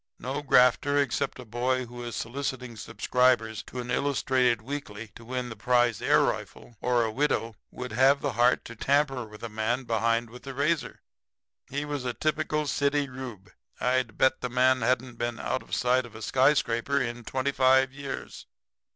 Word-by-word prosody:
No 135 Hz, +4 st, -4 dB
grafter 140 Hz, +1 st, +4 dB
except 140 Hz, -4 st, 0 dB
a 125 Hz, -, -9 dB
boy 125 Hz, +3 st, -1 dB
who 120 Hz, +1 st, -9 dB
is 120 Hz, -1 st, -5 dB
soliciting 125 Hz, -1 st, -4 dB
subscribers 115 Hz, 0 st, +1 dB
to 125 Hz, -, -7 dB
an 125 Hz, 0 st, -4 dB
illustrated 130 Hz, -3 st, +2 dB
weekly 115 Hz, -5 st, -6 dB
to 115 Hz, -, -13 dB
win 125 Hz, +1 st, -4 dB
the 115 Hz, -, -7 dB
prize 120 Hz, 0 st, +2 dB
air -, -, +4 dB
rifle, 120 Hz, -, -3 dB
or 120 Hz, -1 st, +2 dB
a 110 Hz, -, -1 dB
widow, 115 Hz, -3 st, 0 dB
would 125 Hz, 0 st, -7 dB
have 135 Hz, +4 st, +4 dB
the 140 Hz, -, -1 dB
heart 120 Hz, +1 st, +3 dB
to 115 Hz, -, -9 dB
tamper 135 Hz, 0 st, +1 dB
with 105 Hz, 0 st, -13 dB
the 115 Hz, -, -4 dB
man 110 Hz, +4 st, -1 dB
behind 115 Hz, 0 st, 0 dB
with 125 Hz, -, -11 dB
the 135 Hz, -1 st, -8 dB
razor. 150 Hz, +2 st, -1 dB, 0.7 s
He 145 Hz, +2 st, -3 dB
was 145 Hz, -3 st, -4 dB
a 125 Hz, -1 st, -3 dB
typical 155 Hz, 0 st, 0 dB
city 145 Hz, 0 st, +1 dB
Reub 125 Hz, -6 st, -8 dB, 0.3 s
I'd 125 Hz, -3 st, 0 dB
bet 130 Hz, 0 st, +3 dB
the 125 Hz, -, -2 dB
man 130 Hz, +1 st, +3 dB
hadn't 125 Hz, 0 st, 0 dB
been 120 Hz, 0 st, -2 dB
out 130 Hz, -, -2 dB
of -, -, -4 dB
sight 125 Hz, 0 st, +2 dB
of 110 Hz, -, -17 dB
a 110 Hz, -, -8 dB
skyscraper 135 Hz, -1 st, +2 dB
in 120 Hz, -2 st, -3 dB
twenty 130 Hz, +4 st, -1 dB
five 130 Hz, 0 st, +4 dB
years. 140 Hz, -1 st, -7 dB
125 Hz, 180 wpm, -27 LUFS, 120-135 Hz, 0.7 s, grafter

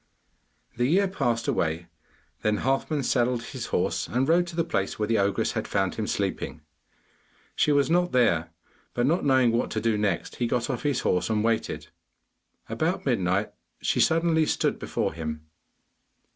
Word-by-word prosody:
The 120 Hz, 0 st, +2 dB
year 195 Hz, +7 st, +3 dB
passed 120 Hz, -, -1 dB
away, 80 Hz, +1 st, 0 dB, 0.6 s
then 105 Hz, 0 st, +1 dB
Halfman 135 Hz, +2 st, 0 dB
saddled 120 Hz, -1 st, +1 dB
his -, -, -6 dB
horse, -, -, 0 dB
and 130 Hz, +2 st, 0 dB
rode 175 Hz, +2 st, +3 dB
to 170 Hz, -, -8 dB
the 165 Hz, -, +2 dB
place 95 Hz, -, -2 dB
where 105 Hz, -, -1 dB
the 115 Hz, -1 st, +2 dB
ogress 100 Hz, 0 st, +1 dB
had -, -, -3 dB
found -, -, 0 dB
him -, -, -3 dB
sleeping. 80 Hz, -, -2 dB, 0.9 s
She 150 Hz, -, +3 dB
was 140 Hz, -1 st, +3 dB
not 175 Hz, +1 st, +2 dB
there, 90 Hz, -10 st, +2 dB, 0.5 s
but 120 Hz, -, +2 dB
not 165 Hz, +6 st, +2 dB
knowing 130 Hz, -3 st, +4 dB
what 115 Hz, +1 st, 0 dB
to 110 Hz, -, -2 dB
do 110 Hz, -1 st, +1 dB
next, 100 Hz, -5 st, -1 dB
he 120 Hz, -, 0 dB
got 120 Hz, +2 st, 0 dB
off 125 Hz, -, -3 dB
his 145 Hz, -4 st, 0 dB
horse 90 Hz, -, +1 dB
and 110 Hz, -1 st, +1 dB
waited. 115 Hz, 0 st, -1 dB, 0.8 s
About -, -, -1 dB
midnight 95 Hz, +3 st, +1 dB, 0.3 s
she -, -, 0 dB
suddenly 160 Hz, -1 st, +3 dB
stood -, -, 0 dB
before -, -, -2 dB
him. 80 Hz, -1 st, -5 dB
120 Hz, 170 wpm, -26 LUFS, 105-145 Hz, 0.9 s, knowing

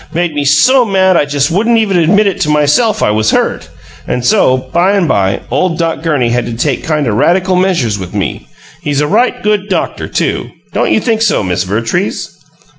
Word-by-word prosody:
Made 175 Hz, -1 st, -1 dB
me 145 Hz, -1 st, -2 dB
so 150 Hz, -, +4 dB
mad 190 Hz, -4 st, +2 dB
I 150 Hz, -, +2 dB
just 145 Hz, 0 st, -1 dB
wouldn't 230 Hz, +6 st, +2 dB
even 205 Hz, -4 st, +1 dB
admit 195 Hz, +3 st, +2 dB
to 150 Hz, -, 0 dB
myself 150 Hz, +9 st, +2 dB
it 105 Hz, -, +2 dB
WAS 110 Hz, 0 st, +1 dB
hurt -, -, -1 dB, 0.4 s
and 125 Hz, 0 st, -2 dB
so, 130 Hz, +1 st, +3 dB
by 175 Hz, +9 st, 0 dB
and 195 Hz, -4 st, +1 dB
by, 100 Hz, -5 st, 0 dB
ole 165 Hz, +6 st, 0 dB
Doc 165 Hz, -2 st, -2 dB
Gurney 145 Hz, -7 st, 0 dB
had 120 Hz, 0 st, -1 dB
to 120 Hz, -, -5 dB
take 135 Hz, +1 st, -1 dB
kind 150 Hz, -3 st, -1 dB
o' -, -, +1 dB
radical 180 Hz, -, +1 dB
measures 170 Hz, -, 0 dB
with 95 Hz, +2 st, -8 dB
me. 100 Hz, -3 st, -3 dB, 0.3 s
He's 145 Hz, -1 st, -1 dB
a -, -, +1 dB
right 245 Hz, +11 st, 0 dB
good 210 Hz, -1 st, 0 dB
doctor, 190 Hz, -, -2 dB
too. -, -, -2 dB, 0.2 s
Don't -, -, 0 dB
you -, -, +3 dB
think 225 Hz, -2 st, -1 dB
so, 225 Hz, -, +1 dB
Miss 90 Hz, -1 st, -1 dB
Vertrees?" 115 Hz, -, -3 dB
155 Hz, 200 wpm, -12 LUFS, 125-190 Hz, 0.4 s, so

